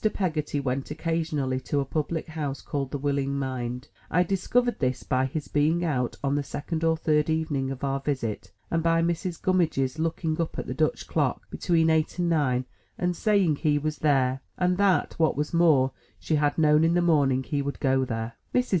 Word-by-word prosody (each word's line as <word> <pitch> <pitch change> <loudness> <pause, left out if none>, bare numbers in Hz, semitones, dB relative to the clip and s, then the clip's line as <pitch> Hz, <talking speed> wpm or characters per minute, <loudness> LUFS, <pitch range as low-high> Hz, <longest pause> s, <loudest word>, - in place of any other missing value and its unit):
Peggotty 155 -6 -1
went 135 0 -2
occasionally 155 -4 -1
to 140 +2 -1
a 140 - 0
public 155 +3 -2
house 150 -4 -3
called 140 -2 -3
The 145 - -3
Willing 140 0 -1
Mind. 130 -1 -3 0.2
I 180 +2 +3
discovered 235 +7 0
this, 130 -2 -1
by 130 0 +1
his 145 +2 -5
being 155 +4 +1
out 125 -6 -1
on 140 0 +1
the 145 - +1
second 160 +4 -4
or 165 0 +3
third 150 -1 +1
evening 155 -4 0
of 135 0 -6
our 135 0 0
visit, 130 -6 -3 0.2
and 165 - +1
by 165 0 +2
Mrs. 170 +1 -2
Gummidge's 160 -7 +1
looking 160 0 -1
up 165 - -3
at - - -3
the - - -4
Dutch - - 0
clock, - - -1
between 165 -3 +2
eight 160 +1 +1
and 175 -1 +1
nine, 130 -6 +1 0.3
and 180 0 0
saying 195 -7 +2
he 150 -2 +2
was 155 +1 -3
there, 135 -3 +2 0.2
and 180 0 +1
that, 200 -2 +3
what 160 -3 +2
was 150 +2 -2
more, 155 -6 +4 0.3
she - - -3
had 145 -1 +1
known 150 -1 +4
in 165 +1 +3
the 175 - +3
morning 140 -6 +3
he 140 +4 -2
would 140 0 -4
go 130 -1 +2
there. 115 -2 -3 0.2
Mrs. 250 0 +2
150 Hz, 200 wpm, -26 LUFS, 135-165 Hz, 0.3 s, more